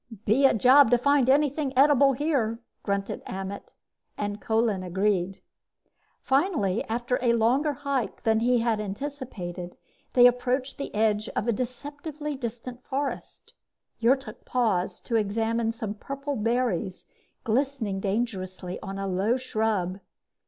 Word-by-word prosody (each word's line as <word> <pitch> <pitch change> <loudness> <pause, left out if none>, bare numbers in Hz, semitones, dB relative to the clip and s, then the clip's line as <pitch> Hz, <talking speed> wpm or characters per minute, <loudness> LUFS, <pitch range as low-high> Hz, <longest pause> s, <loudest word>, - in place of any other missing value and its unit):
"Be 265 +6 +5
a - - +2
job 255 +3 +6
to 245 - +5
find 275 0 +3
anything 285 0 +2
edible 275 0 +6
here," 255 -5 0 0.2
grunted 200 -1 -2
Ammet, 195 +1 -6 0.4
and 205 0 -3
Kolin 220 -3 +1
agreed. 190 0 -1 0.8
Finally, 270 - +1
after 240 +2 -1
a 240 -2 +3
longer 255 +7 +2
hike 275 -3 -3
than 220 -1 +3
he 240 +1 +2
had 230 -2 +1
anticipated, 200 -6 -6 0.4
they 245 -1 +7
approached 250 +2 +1
the 280 - -4
edge 215 0 +1
of - - 0
the 235 - +2
deceptively 290 +5 -5
distant 245 0 -6
forest. 280 +1 -4 0.5
Yrtok 265 +4 +1
paused 215 -8 -1
to 230 - +1
examine 225 +2 0
some 220 -2 -5
purple 275 +6 -5
berries 230 -5 -1 0.4
glistening 230 -4 0
dangerously 190 -3 -3
on 195 0 -6
a 195 - -3
low 195 +6 +1
shrub. 215 -7 -1
235 Hz, 130 wpm, -26 LUFS, 205-265 Hz, 0.8 s, they